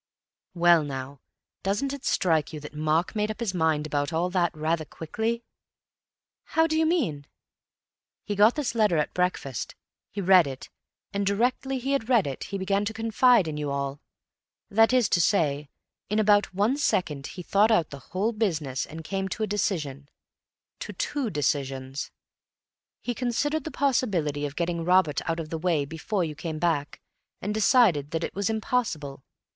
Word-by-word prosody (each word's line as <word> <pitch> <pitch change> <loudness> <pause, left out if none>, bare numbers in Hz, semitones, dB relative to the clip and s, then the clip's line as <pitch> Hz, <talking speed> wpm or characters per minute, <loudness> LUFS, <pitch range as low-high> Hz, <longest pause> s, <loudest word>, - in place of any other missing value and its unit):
"Well, 170 -2 +5
now, 135 -1 -6 0.4
doesn't 205 +9 -1
it 280 - -8
strike 160 -5 +1
you 155 - -6
that 150 - -9
Mark 155 +6 0
made 210 0 0
up 215 - -5
his 225 -5 -2
mind 160 -3 +1
about 145 0 -1
all 170 +2 0
that 175 -2 +2
rather 160 +1 0
quickly?" 220 +10 -3 1.1
"How 320 - +6
do 315 -1 0
you 320 0 +3
mean?" 170 - 0 1.0
"He 205 - -3
got 210 +4 +5
this 290 -6 -1
letter 210 -7 +3
at 150 - 0
breakfast. 180 -9 -2 0.3
He 205 - -6
read 185 -4 +6
it; 135 -1 -7 0.4
and 200 0 0
directly 245 +6 0
he 260 +2 -3
had 270 -4 0
read 235 -6 +4
it 135 -2 -5
he 200 - -4
began 195 +1 0
to 220 - -3
confide 225 -2 +4
in 150 -1 -4
you 150 -1 -2
all. 140 0 -3 0.7
That 225 +3 +5
is 250 -4 +4
to 175 - +3
say, 150 -6 +1 0.4
in 210 - 0
about 205 -1 +4
one 205 +8 +1
second 155 - 0
he 180 - -5
thought 205 +5 +3
out 175 -9 +2
the 140 - -8
whole 195 +6 0
business 160 - -1
and 160 +1 -8
came 195 +2 -2
to 220 - -3
a - - +3
decision—to 155 -9 -5
two 280 -6 -2
decisions. 135 -3 -2 0.9
He 245 - -2
considered 260 +5 -1
the - - -3
possibility 180 - 0
of 140 - -10
getting 170 0 -1
Robert 180 -4 +3
out 165 0 -1
of 155 -2 -6
the 165 - -3
way 165 -4 +1
before 170 +6 -2
you 155 -2 -3
came 160 +1 -5
back, 155 -3 -1 0.4
and 205 +2 -3
decided 210 - +4
that 165 0 -2
it - - -3
was 200 +1 -1
impossible. 200 - -2
180 Hz, 175 wpm, -26 LUFS, 150-220 Hz, 1.1 s, How